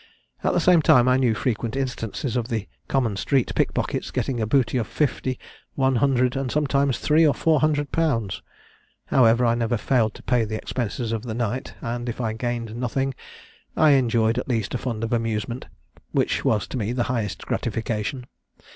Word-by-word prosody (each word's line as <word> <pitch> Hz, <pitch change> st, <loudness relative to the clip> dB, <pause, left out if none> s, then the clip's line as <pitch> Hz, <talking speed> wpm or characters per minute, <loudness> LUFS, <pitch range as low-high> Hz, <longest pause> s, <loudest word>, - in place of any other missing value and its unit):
At -, -, +2 dB
the -, -, +3 dB
same 180 Hz, -3 st, +5 dB
time 125 Hz, -4 st, +5 dB
I 125 Hz, -, +5 dB
knew 125 Hz, -4 st, +2 dB
frequent 115 Hz, 0 st, -2 dB
instances 130 Hz, -2 st, -3 dB
of 120 Hz, -2 st, -1 dB
the 110 Hz, -5 st, -3 dB, 0.2 s
common 120 Hz, -7 st, 0 dB
street 130 Hz, +4 st, +1 dB
pickpockets -, -, -1 dB
getting 125 Hz, -4 st, -2 dB
a 110 Hz, -, 0 dB
booty 130 Hz, +1 st, +2 dB
of 110 Hz, -, -2 dB
fifty, 130 Hz, -1 st, -1 dB, 0.4 s
one 130 Hz, -2 st, +2 dB
hundred, 130 Hz, 0 st, +2 dB
and 135 Hz, -2 st, -2 dB
sometimes 140 Hz, -3 st, +1 dB
three 155 Hz, +2 st, +3 dB
or 150 Hz, -3 st, +4 dB
four 160 Hz, -2 st, +2 dB
hundred 145 Hz, -2 st, +1 dB
pounds. 115 Hz, -, 0 dB, 0.6 s
However, 120 Hz, -1 st, +4 dB
I 115 Hz, -, +3 dB
never 120 Hz, 0 st, 0 dB
failed 110 Hz, -2 st, +1 dB
to -, -, -12 dB
pay 120 Hz, -2 st, +2 dB
the 110 Hz, 0 st, -3 dB
expenses 120 Hz, 0 st, -3 dB
of 115 Hz, -2 st, -1 dB
the 115 Hz, -2 st, -5 dB
night; 120 Hz, +3 st, -3 dB
and 120 Hz, +1 st, -3 dB
if 120 Hz, -, -5 dB
I 110 Hz, -3 st, -1 dB
gained 115 Hz, -1 st, -3 dB
nothing, 135 Hz, +3 st, -1 dB, 0.6 s
I 155 Hz, -1 st, +6 dB
enjoyed 115 Hz, -3 st, +3 dB
at 130 Hz, -, -6 dB
least 115 Hz, -5 st, -1 dB
a 125 Hz, -, -1 dB
fund 115 Hz, -4 st, -3 dB
of 115 Hz, -, -1 dB
amusement, 115 Hz, +1 st, -2 dB, 0.5 s
which -, -, +1 dB
was 105 Hz, -2 st, +1 dB
to -, -, -4 dB
me 110 Hz, 0 st, -1 dB
the 125 Hz, -1 st, 0 dB
highest 115 Hz, -6 st, -3 dB
gratification. 115 Hz, +2 st, -2 dB
120 Hz, 185 wpm, -24 LUFS, 115-135 Hz, 0.6 s, I